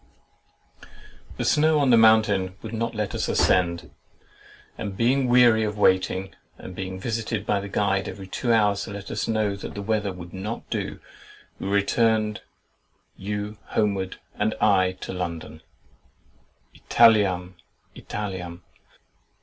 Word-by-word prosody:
The - - -2
snow 155 +1 +3
on 140 -3 +3
the - - +7
mountain 110 -4 +4
would 110 0 -7
not 115 +1 -2
let 105 -1 -2
us - - -2
ascend; 85 -2 +1 0.8
and 100 -3 -6
being 130 +4 +2
weary 120 -2 +5
of 105 -1 -3
waiting 95 -1 +1 0.2
and - - -9
of 90 - -10
being 95 -1 -5
visited 110 0 -3
by 105 - +1
the 100 0 -7
guide 100 -1 0
every 95 - -8
two 120 +5 -2
hours 105 -3 +2
to 115 - -8
let 100 -1 -7
us - - -2
know 110 -3 0
that 100 - -8
the 100 - -4
weather 105 -1 0
would 90 -1 -10
not 100 +4 -5
do, - - -3 0.6
we - - -4
returned, 105 +2 +1 0.7
you 105 +1 -5 0.2
homewards, 100 -3 0 0.2
and 110 +1 -1
I 95 -3 +3
to - - -5
London— 85 -3 -5 1.1
"Italiam, 100 -6 +3 0.4
Italiam!" 90 -4 -6
105 Hz, 140 wpm, -24 LUFS, 95-110 Hz, 1.1 s, the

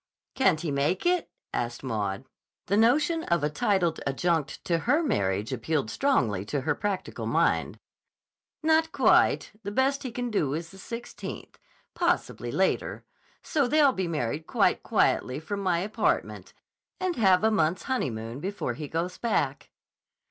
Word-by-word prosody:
"Can't 165 -12 +2
he 165 -4 -2
make 140 - 0
it?" 355 -1 +2 0.2
asked 120 +1 -3
Maud. 105 -6 -2 0.4
The 200 - +1
notion 300 - +3
of 170 -3 +1
a 150 - +1
titled 175 +1 +1
adjunct 160 +2 -1
to 170 -1 +1
her 290 - +2
marriage 100 - 0
appealed 130 -1 -1
strongly 115 - +1
to 140 +6 -2
her 145 +3 +1
practical 200 +2 -3
mind. - - +1 0.9
"Not 320 +1 +3
quite. - - +3
The 205 - -5
best 270 +6 +1
he 265 - -4
can 245 0 -3
do 150 -9 0
is 165 +1 -5
the 195 - -13
16th. 230 +5 -7 0.4
Possibly - - -1
later. - - 0 0.4
So 285 -5 +1
they'll 290 0 +4
be 190 -4 -2
married 150 0 -2
quite - - +2
quietly 130 +2 +1
from 200 +6 -4
my 185 -3 +1
apartment 200 +6 -1 0.4
and 370 -2 -1
have 190 -4 +4
a 220 - +4
month's 175 -3 +1
honeymoon 120 - -3
before 195 +6 -3
he 150 - -6
goes 170 +4 -3
back." 145 - -1
180 Hz, 150 wpm, -27 LUFS, -, 0.9 s, they'll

